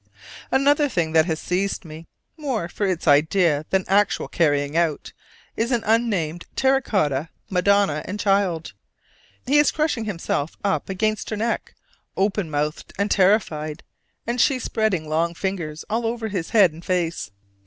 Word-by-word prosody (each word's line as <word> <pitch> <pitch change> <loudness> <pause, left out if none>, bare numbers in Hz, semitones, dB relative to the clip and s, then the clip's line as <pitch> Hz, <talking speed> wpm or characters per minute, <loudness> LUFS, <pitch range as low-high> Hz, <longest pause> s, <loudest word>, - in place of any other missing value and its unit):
Another 285 +2 +3
thing 170 -8 -1
that 160 +1 +4
has 160 -2 -1
seized 190 +1 -2
me, 160 +1 -10 0.3
more 270 - -2
for 200 +3 -2
its 180 -3 -2
idea 155 +1 +3
than 190 -1 +1
actual 200 +2 +2
carrying 145 -2 +1
out, 165 -3 0 0.4
is 235 +3 -1
an 240 -2 +1
unnamed 200 -8 0
terra 270 0 +3
cotta 155 - 0 0.2
Madonna 195 -3 +2
and 205 +2 -5
Child. 195 -5 +1 0.7
He 290 +3 +4
is 295 - +5
crushing 300 -8 -1
himself 165 -6 -3
up 200 -1 -1
against 215 +2 -1
her 215 - -3
neck, 230 +2 -2 0.4
open 195 -2 0
mouthed 150 +1 -3
and 200 +1 0
terrified, 175 -6 +1 0.4
and 240 +1 0
she 275 - +3
spreading 215 -9 -1
long 165 +2 0
fingers 170 -5 -4
all 225 +2 -1
over 230 -1 -3
his 185 -5 -3
head 205 -7 +5
and 160 +2 -13
face. 170 - -1
190 Hz, 155 wpm, -23 LUFS, 160-220 Hz, 0.7 s, is